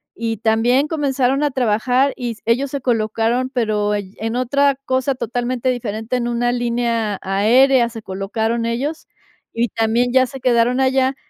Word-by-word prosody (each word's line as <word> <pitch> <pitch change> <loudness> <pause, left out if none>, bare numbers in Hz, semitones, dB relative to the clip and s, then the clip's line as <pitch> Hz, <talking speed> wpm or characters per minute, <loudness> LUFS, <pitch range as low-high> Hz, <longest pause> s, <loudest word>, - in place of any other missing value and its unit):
y 225 -1 -3
también 235 +6 +2
comenzaron 275 -3 0
a 295 - +2
trabajar, 250 +2 +1
y 245 -2 -4
s 225 - -11
ellos 250 +5 +1
se 280 0 -4
colocaron, 230 +1 0
pero 215 -5 0
allí 200 -1 -5
en 225 +2 -3
otra 280 +3 +2
cosa 260 +1 0
totalmente 245 +1 -2
diferente, 225 -1 -2
en 240 -1 -2
una 240 0 0
línea 235 -3 -1
aérea 235 +6 +3
se 225 -2 -9
colocaron 220 +5 -2
ellos, 275 +7 -3 0.5
y 235 +1 0
también 230 +3 0
ya 260 0 +4
se 270 +1 -9
quedaron 245 0 +2
allá. 265 0 +2
240 Hz, 160 wpm, -19 LUFS, 225-260 Hz, 0.5 s, ya